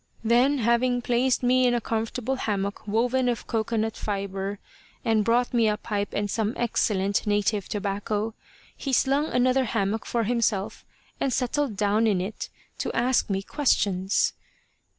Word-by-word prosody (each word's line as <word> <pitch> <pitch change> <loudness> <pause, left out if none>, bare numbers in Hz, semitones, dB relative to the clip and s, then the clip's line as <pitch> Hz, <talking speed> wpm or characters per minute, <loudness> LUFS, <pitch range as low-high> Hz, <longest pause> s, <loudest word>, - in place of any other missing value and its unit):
Then, 245 +5 +3
having 245 +1 +2
placed 250 +1 +1
me 255 +1 +4
in 245 - +2
a - - +1
comfortable 225 +3 -2
hammock 205 -5 -3
woven 245 +4 +1
of 235 -3 -2
cocoanut 225 0 -1
fibre, 195 -1 -3 0.5
and 220 -2 +3
brought 240 +3 +1
me 230 -2 +3
a 210 0 +1
pipe 205 -2 -3
and 205 0 -1
some 220 +2 -1
excellent 205 -3 0
native 205 -1 0
tobacco, 205 +2 -2 0.4
he 275 - -4
slung 275 +4 +2
another 255 0 +2
hammock 215 -1 -1
for 235 -1 0
himself, 220 -3 -1 0.4
and 270 - 0
settled 260 -3 -1
down 210 +2 +2
in 200 -4 +2
it 190 +4 -5 0.3
to - - -2
ask 245 +1 +1
me 195 0 -1
questions. 200 -8 +1
225 Hz, 150 wpm, -26 LUFS, 205-245 Hz, 0.5 s, me